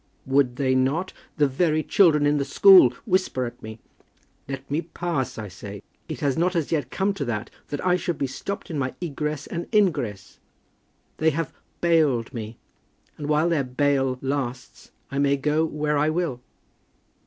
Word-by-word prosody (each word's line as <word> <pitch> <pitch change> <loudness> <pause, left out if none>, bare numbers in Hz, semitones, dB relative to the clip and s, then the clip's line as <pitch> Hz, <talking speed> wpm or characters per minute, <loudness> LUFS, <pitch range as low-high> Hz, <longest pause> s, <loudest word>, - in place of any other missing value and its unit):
"Would 135 -2 +2
they 130 -1 +1
not? 135 +8 0 0.2
The 150 - +4
very 155 +3 +1
children 155 -6 +4
in 145 0 +3
the 140 - +1
school 180 +2 +7 0.2
whisper 185 - 0
at 120 - -8
me. 110 0 -8 0.7
Let 135 0 -6
me 150 +3 +1
pass, 170 -4 -3
I 110 -1 -5
say. 100 +2 -9 0.3
It - - -5
has 140 -3 +1
not 180 +2 +1
as 165 -4 -1
yet 145 -6 0
come 195 +5 0
to 150 -8 -4
that, 110 -2 -3 0.2
that 145 +4 -5
I 180 0 +4
should 175 -3 -3
be - - 0
stopped 195 +9 -5
in 155 - -2
my 130 -1 -2
egress 150 -3 -3
and 170 0 -5
ingress. 145 - 0 0.8
They 160 - +3
have 160 +1 -3 0.3
bailed 150 -9 +2
me; 110 -1 -6 0.6
and 150 -1 -6
while 155 +2 +3
their 160 -5 +1
bail 135 0 +1
lasts, 135 -2 -4 0.2
I 140 - -2
may 140 0 +3
go 150 +3 +1
where 150 -1 -1
I 150 +1 +2
will." 155 -7 -2
145 Hz, 175 wpm, -24 LUFS, 130-165 Hz, 0.8 s, school